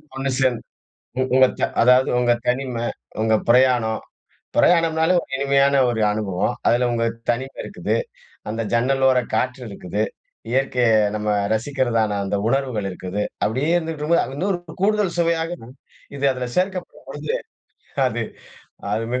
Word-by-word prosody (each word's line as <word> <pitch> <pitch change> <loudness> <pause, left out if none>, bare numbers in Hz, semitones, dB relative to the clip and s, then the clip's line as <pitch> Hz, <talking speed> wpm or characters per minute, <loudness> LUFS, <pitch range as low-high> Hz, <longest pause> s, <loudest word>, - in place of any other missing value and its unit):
ஒண்ணு 135 0 -2
சேர்ந்து, 130 -3 +2 0.6
உ - - +3
உங்க 130 0 +7
த - - -1 0.2
அதாவது 125 +2 +5
உங்க 120 -1 +3
தனிமை, 125 -2 -1 0.4
உங்க 110 0 +2 0.2
பிரயாணம். 120 -3 +3 0.6
பிரயாணம்னாலே 165 0 +4
ஒரு - - -14
இனிமையான 140 0 +3
ஒரு 110 -2 -1
அனுபவம். 100 -3 -1
அதில 120 +1 +3
உங்க 115 -1 0 0.2
தனிமை 130 +3 -1
இருக்குது. - - -2 0.5
அந்த 115 +2 -2
ஜன்னலோர 130 +2 +3
காற்று 130 0 0
இருக்குது. 100 +1 -3 0.5
இயற்கைய 125 -2 +2 0.3
நம்ம 105 0 -2 0.2
ரசிக்கிறதான 115 -4 0
அந்த 100 +1 -1
உணர்வுகள் 125 -5 0
இருக்குது. 95 +3 -4 0.2
அப்படியே 130 +9 0
இருந்துகிட்டு 160 -3 -2
இருக்கும்போது 170 +3 +3
அது 135 - -8
இன்னொரு 185 +2 0 0.2
கூடுதல் 210 -3 +2
சுவையாகவும். 165 -6 -1 0.4
இது 140 0 -1
அதில 125 -1 -4
சேர்க்கப்படும் 185 -6 -2
பொழுது, 145 +2 -3 0.7
அது - - -3 0.7
அது 110 +2 0
மிக 125 - 0
130 Hz, 135 wpm, -22 LUFS, 115-145 Hz, 0.7 s, உங்க